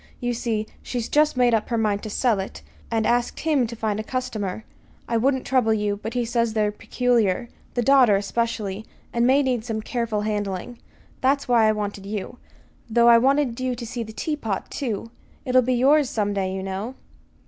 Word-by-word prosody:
You 245 -1 -1
see, 225 -2 -1 0.2
she's 240 -2 -3
just 300 -2 +2
made 245 -1 +4
up 220 -1 +1
her 235 - 0
mind 210 -2 +1
to 215 - -6
sell 225 -1 +1
it, 190 - -6 0.3
and 225 -1 0
asked 240 +1 0
him 295 -7 +2
to 235 - -7
find 215 -2 -2
a - - -2
customer. 220 -5 -3 0.4
I 230 - +1
wouldn't 265 +2 +1
trouble 245 -4 +2
you, 205 -1 -1
but 225 - -5
he 245 -1 +1
says 230 -1 0
they're 210 -1 +1
peculiar 235 -1 0 0.3
the 245 - +1
daughter, 260 -5 +6
especially 210 0 -2 0.3
and 235 +1 +2
may 275 +2 +4
need 250 -4 0
some 225 -2 -3
careful 230 -4 -2
handling. 210 +1 -3 0.4
That's 275 +2 +2
why 235 -3 +4
I - - +5
wanted 205 -2 -4
you 210 +3 -5 0.5
though 235 +1 +5
I 235 0 +8
wanted 270 -1 +2
you 255 -1 -1
to 240 0 -7
see 235 +1 -5
the 220 -1 -6
tea 300 +7 -2
pot, 220 -9 -4
too, 230 -4 -3 0.3
it'll 255 -1 +4
be 255 +1 +1
yours 275 +2 +4
some 205 -2 -1
day, 190 -2 -1
you 190 0 -4
know." 195 +6 -4
230 Hz, 200 wpm, -24 LUFS, 210-250 Hz, 0.5 s, I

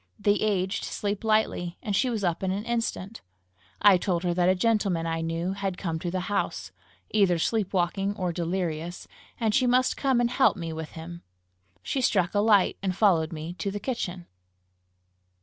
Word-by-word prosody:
The 205 0 +2
aged 195 -3 0
sleep 205 0 -3
lightly, 215 -5 +1
and 205 -2 -1
she 255 +6 +2
was 220 -4 -2
up 175 -2 0
in 190 - -1
an 200 +3 -2
instant. 230 -3 -3 0.6
I 200 -3 +8
told 175 -1 -1
her 175 -1 +1
that 175 +1 +2
a 185 - +4
gentleman 195 -5 +1
I 165 0 -1
knew 165 +3 -2
had 195 -2 -3
come 165 -4 -3
to 175 - -3
the 185 +1 -2
house, 205 +3 -2 0.4
either 195 -5 +3
sleep 205 +3 0
walking 195 +2 0
or 180 -2 -1
delirious, 170 -1 -3 0.3
and 220 -3 +1
she 255 +1 +3
must 255 +1 +3
come 265 -3 +2
and 240 0 +1
help 260 -4 +3
me 165 -2 -4
with 160 -1 -7
him. 170 +1 -8 0.6
She 270 - -1
struck 190 -8 +2
a 205 - +2
light, 205 -3 +4
and 190 -2 -1
followed 175 -6 +3
me 160 +1 -6
to 200 - -1
the 205 +1 -4
kitchen. 185 -7 -4
190 Hz, 185 wpm, -27 LUFS, 175-210 Hz, 0.6 s, I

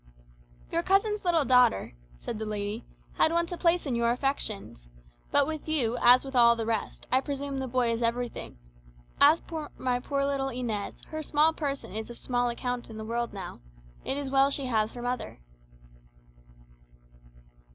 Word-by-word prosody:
"Your 335 - +1
cousin's 405 +3 +1
little 335 -5 +2
daughter," 250 - +3 0.2
said 215 - -6
the 220 - -3
lady, 210 +2 -4 0.3
"had 315 - +4
once 340 +1 0
a - - -2
place 340 0 +2
in 265 -4 -1
your 235 0 +2
affections. 230 - -2 0.4
But 285 - +4
with 310 0 -5
you, 245 -7 +1
as 250 +2 +7
with 270 0 -7
all 235 -1 +6
the 225 -1 -3
rest, 225 -2 -3
I 260 - +4
presume 280 -1 -4
the 265 - -3
boy 245 -1 +1
is 230 +1 -2
everything. 235 - -2 0.6
As 300 +4 +6
for 315 -3 -6
my 250 -1 0
poor 275 +2 -1
little 275 -1 -1
Inez, 235 -5 -3
her 315 -1 -4
small 310 +1 +3
person 280 - -4
is 220 +2 -4
of 240 - -8
small 245 -1 0
account 245 0 -4
in 220 - -9
the 220 - -6
world 235 +1 -2
now. 190 - -8 0.4
It 270 - -2
is 280 -2 -4
well 275 0 +4
she 280 -1 -2
has 220 -3 0
her 240 - -7
mother." 250 - -4
255 Hz, 175 wpm, -28 LUFS, 235-285 Hz, 0.6 s, as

